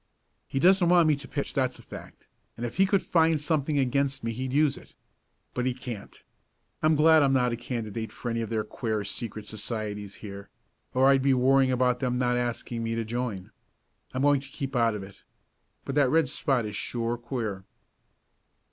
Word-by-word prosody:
"He - - -4
doesn't 180 +2 +5
want 175 -2 +6
me 155 - +4
to 140 -1 -10
pitch, 140 - -3
that's 130 -2 0
a - - -15
fact, - - -11 0.3
and 120 - -3
if 120 - -6
he 195 +1 +5
could 195 0 +2
find 165 -2 +3
something 150 -1 0
against 140 +1 0
me 115 - -1
he'd 130 +3 -4
use 150 +1 +3
it. - - -15 0.6
But 125 0 -1
he 125 - 0
can't. 120 -6 -8 0.6
I'm 155 0 +4
glad 160 +1 +6
I'm 135 -1 +3
not 125 -2 +2
a - - 0
candidate 115 -2 -4
for 120 - -5
any 115 0 -1
of 115 - -4
their 110 -2 0
queer 110 0 -3
secret 110 +1 -5
societies 105 -2 -5
here, 100 -1 -9 0.5
or 130 +1 +4
I'd 135 -1 +5
be 135 0 +3
worrying 130 +1 +4
about 125 -1 +2
them 125 -2 0
not 125 -1 +1
asking 120 -1 -2
me 115 0 -2
to 115 -1 -2
join. 115 -5 -4 0.6
I'm 130 +1 -2
going 145 -1 +4
to 135 - -12
keep 135 -2 -5
out 115 -2 +3
of 100 - -5
it. 95 0 -13 0.6
But 135 - -3
that 145 -2 +3
red 160 0 +3
spot 135 -5 0
is 105 -1 -5
sure 115 +2 -2
queer." 115 -5 -4
125 Hz, 200 wpm, -27 LUFS, 115-140 Hz, 0.6 s, want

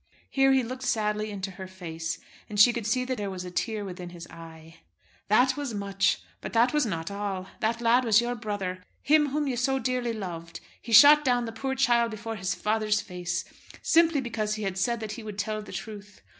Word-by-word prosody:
Here 270 0 +4
he 265 -1 +3
looked 255 +2 -6
sadly 215 -4 0
into 195 -1 -5
her 190 +1 -8
face, 170 -3 -5 0.3
and 210 -1 -3
she 240 +4 +8
could 230 -3 -3
see 250 +3 +1
that 255 -2 -3
there 200 -1 -2
was 185 -1 -6
a 180 - -7
tear 215 +2 -2
within 180 -2 -7
his 170 -1 -10
eye. 165 -1 -12 0.5
"That 250 +5 +4
was 285 -6 -4
much, 200 -1 0 0.2
but - - -6
that 240 +3 +3
was 300 -5 +2
not 165 -2 -3
all. 200 -2 -3
That 230 +2 -1
lad 240 +2 +4
was 225 -2 +5
your 240 +1 -1
brother, 205 -5 -4 0.2
him 300 +1 +4
whom 295 +2 -1
you 265 -3 -1
so 270 +2 +1
dearly 250 -3 -1
loved. 170 -5 -6 0.2
He 235 - -9
shot 290 +6 +9
down 245 -3 +2
the 225 - -5
poor 265 +4 -3
child 240 -3 +3
before 225 +1 -6
his 190 -2 -2
father's 215 0 +1
face, 180 -3 -4 0.4
simply 330 -3 +4
because 215 -3 -2
he 215 - -5
had 190 -1 -2
said 235 +4 0
that 215 -1 -4
he 240 - -6
would 210 -2 -7
tell 215 +1 -2
the 210 - -11
truth. 205 -2 -8
215 Hz, 215 wpm, -27 LUFS, 195-245 Hz, 0.5 s, shot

